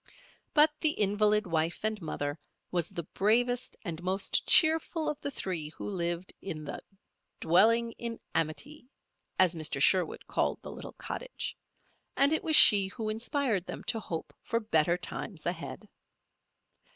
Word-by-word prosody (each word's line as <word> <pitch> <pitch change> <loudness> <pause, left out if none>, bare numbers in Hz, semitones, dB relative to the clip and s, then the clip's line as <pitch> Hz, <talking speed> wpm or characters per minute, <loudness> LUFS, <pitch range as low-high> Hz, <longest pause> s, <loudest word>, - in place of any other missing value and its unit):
But 300 +1 +6
the 310 -2 +2
invalid 210 +1 +2
wife 165 -1 -1
and 215 -2 -1
mother 145 -1 -3 0.3
was 175 -3 0
the 170 - -5
bravest 245 +8 0
and 170 -2 -5
most 190 +2 0
cheerful 320 0 +4
of 300 -1 -3
the - - -3
three 180 - -3
who - - -8
lived 175 -2 -2
in 155 -5 -5
"the - - -6 0.6
dwelling 230 +7 +4
in 230 -1 -5
amity," 245 - -3 0.5
as 185 -2 +4
Mr. 155 -4 -4
Sherwood 180 +3 +2
called - - 0
the - - -7
little - - -9
cottage, - - -5 0.6
and 280 +3 +4
it 315 - 0
was 315 - +3
she 200 -7 +8
who 215 +2 -5
inspired 225 -3 -1
them - - -6
to 225 - -1
hope 165 -6 -6
for 230 - -1
better 175 -6 +2
times 180 -1 -6
ahead. 175 +4 -5
200 Hz, 150 wpm, -30 LUFS, 170-235 Hz, 0.6 s, she